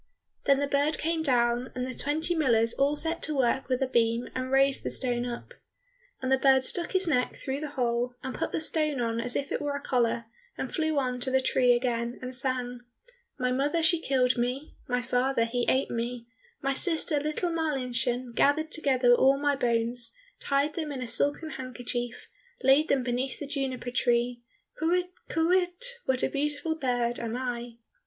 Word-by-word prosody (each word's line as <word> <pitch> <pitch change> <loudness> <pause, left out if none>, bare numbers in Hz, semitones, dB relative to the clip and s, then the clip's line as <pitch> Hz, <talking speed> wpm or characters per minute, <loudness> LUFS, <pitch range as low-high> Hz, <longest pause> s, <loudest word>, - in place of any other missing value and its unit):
Then 275 -1 +5
the 285 - +1
bird 285 +2 +1
came 325 0 -1
down, 245 -3 +1
and 250 0 -2
the 255 - -4
twenty 310 +6 0
millers 235 -8 +3
all 280 +2 +2
set 325 +2 +2
to 310 - -2
work 265 +1 +1
with 255 +1 +1
a - - 0
beam 235 -1 +1
and 255 0 -3
raised 270 0 +3
the - - -3
stone 245 -1 0
up. 240 -1 -7 0.7
And 260 - -1
the 265 - +4
bird 265 -1 +5
stuck 345 +6 +1
his 375 -1 +3
neck 250 -6 +1
through 270 +1 -4
the 305 0 -4
hole, 245 0 0
and 260 - -4
put 325 - -3
the - - -1
stone 305 -3 +1
on 230 -1 -1
as 245 - -2
if 280 - -2
it - - -1
were 290 -1 -2
a - - -2
collar, 240 -4 0 0.3
and - - -4
flew 315 -2 0
on 250 -2 0
to 255 - 0
the 265 0 +3
tree 255 -1 +3
again, 240 -1 -1
and 255 0 -6
sang, 250 -1 0 0.6
"My 250 -2 0
mother 290 +6 +1
she 320 +1 +3
killed 255 -3 +2
me, 250 +5 -2
My 250 0 0
father 250 0 +1
he 240 +1 -1
ate 260 +1 +1
me, 235 0 -3 0.4
My 275 0 +1
sister, 320 -1 0
little 305 +4 -2
Marlinchen, 255 -6 -1
Gathered 310 +5 +2
together 260 -6 +3
all 270 +3 +5
my 285 0 +1
bones, 235 - +1 0.2
Tied 280 +2 +1
them 315 -3 -3
in 260 -2 -4
a - - -5
silken 290 +7 0
handkerchief, 245 -1 -5 0.4
Laid 275 +4 +5
them 270 -2 +2
beneath 250 +1 -2
the - - -4
juniper 270 -3 -3
tree, 240 -1 +1 0.4
Kywitt, 355 +3 +1 0.2
kywitt, 360 +8 0
what 260 -1 0
a - - +4
beautiful 295 +3 -1
bird 245 -5 -1
am 235 0 -3
I!" 240 -2 -4
260 Hz, 190 wpm, -28 LUFS, 245-295 Hz, 0.7 s, Then